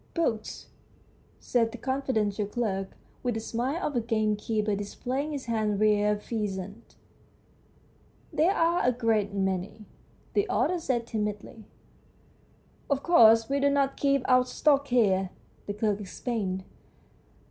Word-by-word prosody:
" - - -34
Books! 230 -11 -2 0.4
" - - -33
said 230 -2 +3
the 245 - -8
confi 260 +3 -3
dential 205 -1 0
clerk, 195 -5 -2 0.2
with 245 -3 -1
the - - -1
smile 255 +10 -2
of 290 - -2
a 240 - +2
gamekeeper 215 -1 0
displaying 255 +8 -3
his 285 -3 -5
hand 215 -3 0
reared 210 -1 +2
pheasants. 205 -1 -5 0.7
" - - -33
There 325 +5 +3
are 335 +1 +2
a 250 - +3
great 225 -4 +1
many," 190 +2 -2 0.5
the 410 +1 +1
author 360 - +1
said 250 -7 -1
timidly. 210 -1 -4 0.6
" - - -33
Of 280 -1 0
course, 225 -9 +6
we 280 +1 0
do 280 0 +3
not 280 -1 +1
keep 275 -2 +1
our 255 -1 +5
stock 280 +2 +2
here," 195 -7 +2 0.4
the 205 - -2
clerk 210 -1 0
explained. 195 -2 -3
225 Hz, 145 wpm, -28 LUFS, 210-265 Hz, 0.7 s, course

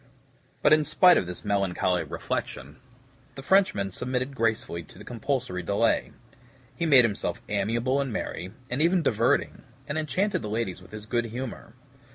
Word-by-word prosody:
But - - +6
in 155 0 +5
spite 180 +4 +6
of - - 0
this 90 +3 -7
melancholy 95 -3 +1
reflection, 70 +3 -5 0.6
the 135 - -8
Frenchman 185 - +3
submitted 130 +5 -3
gracefully 110 -7 -1
to 80 - -15
the - - -11
compulsory 120 -5 -2
delay. 100 +6 +1 0.6
He 170 - -1
made 135 -5 +7
himself 105 -3 -2
amiable 115 +7 0
and 135 -3 -3
merry, 90 -3 -4 0.2
and 125 +4 0
even 170 +1 +3
diverting, 115 -3 +1 0.3
and 145 +2 -1
enchanted 155 +8 0
the 105 - -5
ladies 105 -4 -2
with 90 - -16
his 105 0 -8
good 120 +1 0
humor. 120 0 -7
115 Hz, 160 wpm, -27 LUFS, 100-140 Hz, 0.6 s, made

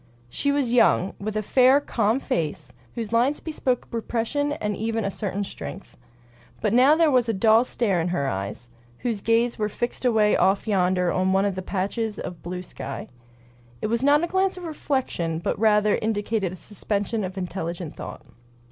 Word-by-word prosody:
She 280 - 0
was 275 -4 0
young, 195 -5 +4
with 215 +1 -3
a 215 - -1
fair, 260 +5 +5
calm 230 -3 0
face, 155 - -3 0.2
whose 225 -1 -4
lines 250 +6 +2
bespoke 265 -6 -2
repression 240 +5 -1
and 210 -8 -2
even 225 -1 -2
a 200 - -1
certain 200 0 -3
strength. 195 0 -8 0.6
But 210 - 0
now 260 +5 +6
there 325 -2 +4
was 245 -3 +3
a - - +2
dull 220 +3 +5
stare 200 -9 0
in 165 - -1
her 175 -6 -1
eyes, 100 +3 -5 0.3
whose 230 -5 -2
gaze 230 +2 +1
was 210 -1 -1
fixed 240 +4 -3
away 220 -4 +3
off 195 +3 +2
yonder 180 -3 +2
on 185 0 +1
one 195 +1 +3
of 200 - 0
those 185 0 -6
patches 210 +3 -2
of 175 - -6
blue 180 +1 -5
sky. 140 -5 -7 0.7
It - - -2
was 235 - +1
not 290 +3 +4
a - - +1
glance 380 +1 +1
of 360 - -8
reflection, 265 - -2
but 170 - -2
rather 210 -1 +4
indicated 210 -3 -1
a - - -7
suspension 205 +2 -3
of 185 +1 -5
intelligent 175 -3 -4
thought. - - -8
215 Hz, 185 wpm, -24 LUFS, 185-245 Hz, 0.7 s, now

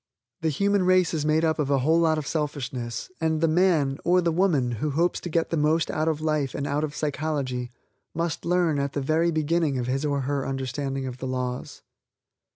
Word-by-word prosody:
The 160 - +1
human 200 +6 +1
race 185 -1 +3
is 155 -2 -1
made 155 +1 +3
up 160 0 0
of 145 -2 0
a 140 - +3
whole 155 +6 +3
lot 160 -2 +3
of 155 - -3
selfishness, 135 -5 -3
and 160 -1 +1
the 165 - +3
man, 155 -5 +2
or 180 +1 +4
the 170 -2 +1
woman, 160 -8 +2
who 155 - 0
hopes 170 +5 +1
to 175 - -6
get 165 0 0
the 165 - +1
most 155 +2 +2
out 155 +1 -1
of 155 -1 0
life 155 -4 0
and 140 - -2
out 145 +1 -1
of 150 -1 -3
psychology, 140 -4 -2 0.5
must 165 -1 -2
learn 170 -4 +2
at 140 0 -2
the - - -1
very 160 +5 +2
beginning 160 -2 +1
of 125 - -2
his 135 +3 -1
or 140 -2 0
her 140 0 -2
understanding 135 +1 -3
of 130 -1 -5
the 130 - -4
laws. 125 -1 -4
155 Hz, 215 wpm, -25 LUFS, 135-165 Hz, 0.5 s, or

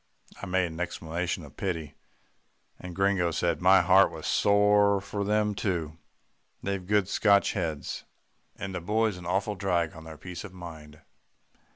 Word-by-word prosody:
I 100 - -5
made 95 0 +2
an 80 -1 -7
exclamation 85 0 -3
of - - -16
pity, 85 -5 -3 0.9
and 90 -1 -8
Gringo 95 -3 +2
said, 85 -1 -1
"My 95 +2 +6
heart 95 +1 +5
was - - -8
sore 100 0 +4
for 100 +1 -4
them 105 +1 +1
too. 85 -6 -3 0.6
They've 100 -1 -2
good 100 0 +2
Scotch 100 0 +3
heads, 75 -3 -3 0.5
and 95 -1 -6
the 90 - -4
boy's 105 +2 0
an 90 -1 -9
awful 100 +4 0
drag 90 -4 -1
on 80 0 -11
their 80 -1 -9
peace 90 0 -8
of 100 -3 -10
mind. 80 -4 -11
95 Hz, 160 wpm, -28 LUFS, 85-100 Hz, 0.9 s, My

